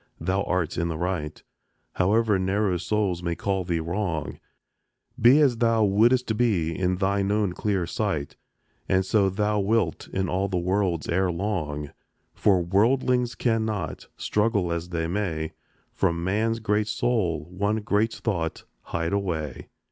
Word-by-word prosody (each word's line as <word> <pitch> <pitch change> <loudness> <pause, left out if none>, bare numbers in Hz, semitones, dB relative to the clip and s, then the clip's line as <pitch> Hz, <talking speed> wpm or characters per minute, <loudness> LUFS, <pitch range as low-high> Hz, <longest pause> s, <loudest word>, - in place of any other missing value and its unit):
thou 95 +1 0
art 90 -2 -1
in 85 - 0
the 80 -2 -3
right, 85 -3 -3 0.5
However 105 +2 +2
narrow 95 0 +1
souls 95 -1 -1
may 85 -1 -2
call 95 0 -1
thee 85 -2 -1
wrong; 85 -2 -3 0.8
Be 125 +6 +7
as 130 -5 +3
thou 115 -2 +3
wouldst 110 +4 +3
be 90 -9 +1
in 90 0 0
thine 100 +1 0
own 105 -3 +1
clear 95 -2 -1
sight, 85 -6 -2 0.5
And 95 0 +2
so 100 -1 +3
thou 105 +2 0
wilt 100 -4 0
in 95 0 -2
all 95 +3 0
the 95 -2 -2
world's 90 -2 0
ere 95 +1 +1
long; 80 -6 -3 0.4
For 95 -4 +3
worldlings 120 +6 +2
cannot, 110 -6 -1
struggle 105 -5 +1
as 85 +1 -4
they 85 -2 -2
may, 85 -4 -2 0.4
From 85 0 0
man's 110 +5 0
great 105 -1 0
soul 105 -9 0
one 100 +4 0
great 105 +2 +1
thought 85 -8 -3 0.2
hide 85 +2 -2
away. 80 -9 -3
95 Hz, 145 wpm, -25 LUFS, 85-105 Hz, 0.8 s, Be